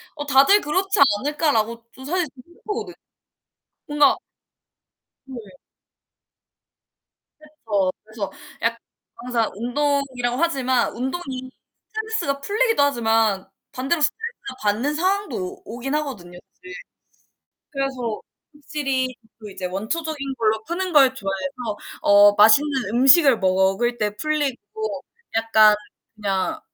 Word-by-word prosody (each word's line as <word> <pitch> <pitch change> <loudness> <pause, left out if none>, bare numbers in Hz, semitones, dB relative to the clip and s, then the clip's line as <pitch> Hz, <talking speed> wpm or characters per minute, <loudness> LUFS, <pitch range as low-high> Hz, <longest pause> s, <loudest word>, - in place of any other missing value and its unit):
어 290 -1 -5
'다들 285 +9 +5
그렇지 370 +5 0 0.2
않을까.'라고 235 -5 -1
저 265 +1 -11
사실 355 +3 0 0.2
생각하거든. 385 +5 -7 0.9
뭔가 295 -1 +4 1.1
네. 260 -2 -9 2.0
그쵸. 220 -12 -2
그래서 215 -2 -6 0.3
약 230 0 0 0.4
항상 235 -3 -1
운동이라고 255 0 -1
하지만 260 -7 +1
운동이 260 -1 -5 0.4
스트레스가 440 -11 -2
풀리기도 440 -2 +2
하지만 225 -7 +1 0.3
반대로 275 +5 -1
스트레스를 445 - -2
받는 235 +9 0
상황도 375 - 0
오 185 -1 -6 0.2
오긴 270 +3 -4
하거든요 205 -13 -5 0.2
사실. 375 +2 -12 1.0
그래서 265 -5 -3 0.3
확실히 270 -3 -2 0.2
그 210 -2 -10
이제 185 -1 -6
원초적인 275 - -3
걸로 220 -1 +1
푸는 360 +1 -3
걸 270 -3 +6
좋아해서 225 +1 -4 0.2
어 205 0 +6
맛있는 255 +4 +4
음식을 270 0 +6
먹을 190 +5 +1
때 210 -1 -1
풀리고 305 - -3 0.3
약간 220 -2 +5 0.4
그냥 195 -3 -2
265 Hz, 255 characters per minute, -22 LUFS, 220-300 Hz, 2.0 s, 걸